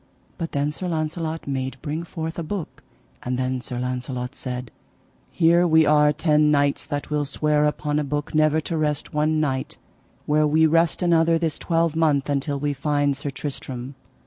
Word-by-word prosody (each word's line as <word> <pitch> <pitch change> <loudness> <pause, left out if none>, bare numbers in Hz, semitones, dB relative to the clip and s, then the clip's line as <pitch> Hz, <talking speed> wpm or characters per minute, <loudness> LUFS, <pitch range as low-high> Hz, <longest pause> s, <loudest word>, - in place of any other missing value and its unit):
But 165 -1 -4
then 145 +1 0
Sir 180 +4 -5
Launcelot 160 0 -3
made 130 -1 -3
bring 155 +2 -3
forth 160 -1 -5
a - - -2
book: 180 0 -5 0.4
and 125 0 -2
then 130 0 -1
Sir 125 -1 -5
Launcelot 125 0 -3
said: 125 -4 -6 0.6
Here 170 +1 +4
we 160 -1 +5
are 150 0 +5
ten 150 0 +3
knights 145 -1 +1
that 145 +1 -4
will 150 -1 +1
swear 150 +1 +1
upon 150 0 0
a - - 0
book 145 +1 -3
never 155 0 +3
to 165 +2 -3
rest 150 -2 -1
one 155 +1 +1
night 135 -4 -2 0.5
where 150 0 +3
we 160 +2 +4
rest 165 +2 +2
another 165 -1 +4
this 165 -2 -2
twelvemonth 160 -4 +1
until 140 +1 -1
that 140 - -8
we 145 -1 +1
find 145 0 0
Sir 145 +1 -4
Tristram. 130 -2 -6
150 Hz, 175 wpm, -23 LUFS, 140-160 Hz, 0.6 s, we